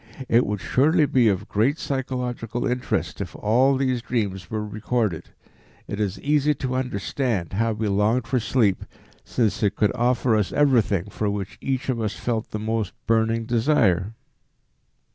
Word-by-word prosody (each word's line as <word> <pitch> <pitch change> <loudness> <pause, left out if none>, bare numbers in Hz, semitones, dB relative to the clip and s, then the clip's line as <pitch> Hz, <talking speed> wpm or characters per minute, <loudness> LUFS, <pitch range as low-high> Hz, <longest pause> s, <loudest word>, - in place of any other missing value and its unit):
It 120 +1 +3
would 105 0 -2
surely 155 +4 +3
be 125 -4 +3
of 100 +1 0
great 125 +9 +1
psychological 125 -4 -3
interest 125 0 -2
if - - -6
all 130 +6 +3
these 130 -2 0
dreams 100 -7 -2
were 110 -1 -3
recorded. 105 -4 -2 0.6
It 100 - -5
is 100 -2 -1
easy 150 0 +2
to 130 -1 -3
understand 125 - -2
how 115 +3 +1
we 110 0 -2
longed 105 +5 +1
for 130 0 0
sleep, 110 -5 +1 0.4
since 115 -4 0
it 105 -3 +1
could 105 +1 +1
offer 120 -1 +2
us 105 -3 0
everything 110 -9 +2
for 105 0 -1
which 100 -1 -5
each 135 -1 -2
one 130 -3 -1
of - - -1
us 105 - -3
felt 115 -2 -2
the - - -4
most 110 -2 -2
burning 115 0 +1
desire." 115 - +2
115 Hz, 160 wpm, -24 LUFS, 105-130 Hz, 0.6 s, It